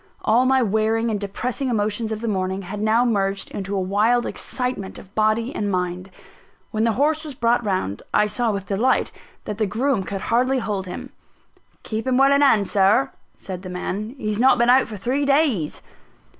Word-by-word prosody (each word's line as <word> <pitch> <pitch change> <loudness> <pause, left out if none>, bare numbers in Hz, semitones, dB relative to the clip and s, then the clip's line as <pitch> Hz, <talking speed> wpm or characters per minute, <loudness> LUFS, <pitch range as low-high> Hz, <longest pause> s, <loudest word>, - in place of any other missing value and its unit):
All 240 +4 +4
my 265 -1 +3
wearing 220 +2 +1
and 210 - -1
depressing 245 +6 -3
emotions 215 0 -1
of 220 0 -4
the 235 - -3
morning, 190 -1 -2
had 205 +3 -6
now 220 +3 +3
merged 195 -4 0
into 195 0 -4
a - - 0
wild 210 +6 +2
excitement 250 -7 -3
of 195 - -14
body 220 +3 +1
and 205 -1 -2
mind. 180 0 -2 0.6
When 220 0 0
the 230 - +2
horse 300 +6 +1
was 300 -4 -7
brought 240 -1 +1
round, 185 - -2
I 210 - +3
saw 230 +3 0
with 200 -2 -3
delight 225 +7 +1 0.3
that 210 0 -5
the 215 - +1
groom 235 +3 0
could 195 +1 -5
hardly 255 +5 +1
hold 205 -6 -3
him. 180 - -7 0.7
"Keep 220 +3 -4
him 255 -1 +2
well 275 +1 +5
in 280 - +3
hand, 220 -8 +4
Sir," 205 +7 +3 0.3
said 185 -2 -7
the 185 - -8
man, 200 +6 -4
"he's 215 -4 -2
not 260 +1 +5
been 240 0 +4
out 260 +1 +4
for 215 - -7
three 255 +8 -1
days." 275 - +1
215 Hz, 195 wpm, -22 LUFS, 200-250 Hz, 0.7 s, well